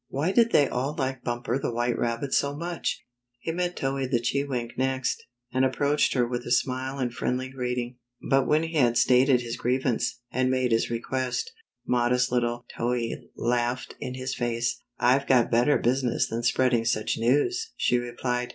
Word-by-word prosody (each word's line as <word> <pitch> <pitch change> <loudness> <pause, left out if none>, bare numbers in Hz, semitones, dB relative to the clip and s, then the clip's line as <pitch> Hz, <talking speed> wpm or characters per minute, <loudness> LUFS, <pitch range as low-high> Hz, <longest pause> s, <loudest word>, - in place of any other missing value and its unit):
Why 150 +7 -1
did 230 +2 +4
they 145 - +5
all 135 +5 -2
like 130 -2 -2
Bumper 120 +1 -2
the - - -2
White 120 +1 0
Rabbit 120 +3 -2
so 140 0 +1
much? 170 +2 -3 0.3
He 165 - -3
met 180 +1 -2
Towhee 135 0 -1
the 120 -3 +2
Chewink 125 -1 -2
next, 130 0 -1 0.3
and 130 0 +2
ap 130 0 +1
proached 145 0 +2
her 125 -2 +3
with 120 0 -3
a - - -7
smile 130 +2 0
and 125 -3 -2
friendly 130 +2 -2
greeting, 125 -1 -3 0.3
but 135 -1 +3
when 155 +2 +3
he 165 0 -3
had 120 -3 +3
stated 125 +1 +4
his 120 -1 -5
grievance, 125 -1 0
and 130 +1 +1
made 130 -1 +1
his 115 0 +2
request, 130 - -2 0.3
modest 125 +1 +2
little 120 -1 0
Towhee 120 -1 -2
laughed 120 +1 -1
in 125 - -5
his 130 +1 -3
face. 120 -2 -1
" 120 - -57
I've 130 +3 +3
got 125 -3 +4
better 120 +5 +4
business 125 0 +1
than 115 +1 -3
spreading 125 -1 +2
sucK 115 -2 0
news," 145 - +1
she 125 - +2
replied. 125 0 -2
125 Hz, 180 wpm, -26 LUFS, 120-135 Hz, 0.3 s, they